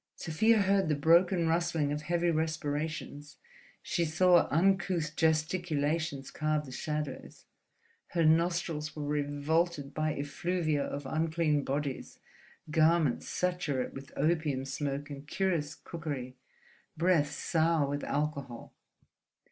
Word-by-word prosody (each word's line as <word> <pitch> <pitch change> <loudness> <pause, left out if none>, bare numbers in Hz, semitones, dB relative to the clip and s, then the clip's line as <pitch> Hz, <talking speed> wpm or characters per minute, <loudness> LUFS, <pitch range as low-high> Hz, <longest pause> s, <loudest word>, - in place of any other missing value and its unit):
Sofia 210 +7 +2
heard 195 -3 +2
the 150 - +2
broken 170 +3 +4
rustling 160 -3 +1
of 150 +1 -2
heavy 170 +2 +1
respirations; 155 -2 -3 0.5
she 175 - 0
saw 175 +2 +4
uncouth 175 -2 +1
gesticulations 160 -3 0
carve 155 -1 -1
the 130 - -10
shadows; 150 +1 -5 0.6
her 170 -2 +1
nostrils 160 -2 +1
were 150 -1 -4
revolted 145 +1 -1
by 155 0 -1
effluvia 155 0 -1
of 140 0 -5
unclean 155 0 0
bodies, 140 0 -3 0.5
garments 160 -4 +3
saturate 180 -8 -1
with 135 0 -9
opium 150 -3 0
smoke 140 +1 -3
and 140 +1 -8
curious 165 -5 -1
cookery, 145 -7 -6 0.6
breaths 160 -4 +2
sour 160 -3 +1
with 145 +1 -3
alcohol. 140 -4 -3
155 Hz, 110 wpm, -31 LUFS, 145-170 Hz, 0.6 s, broken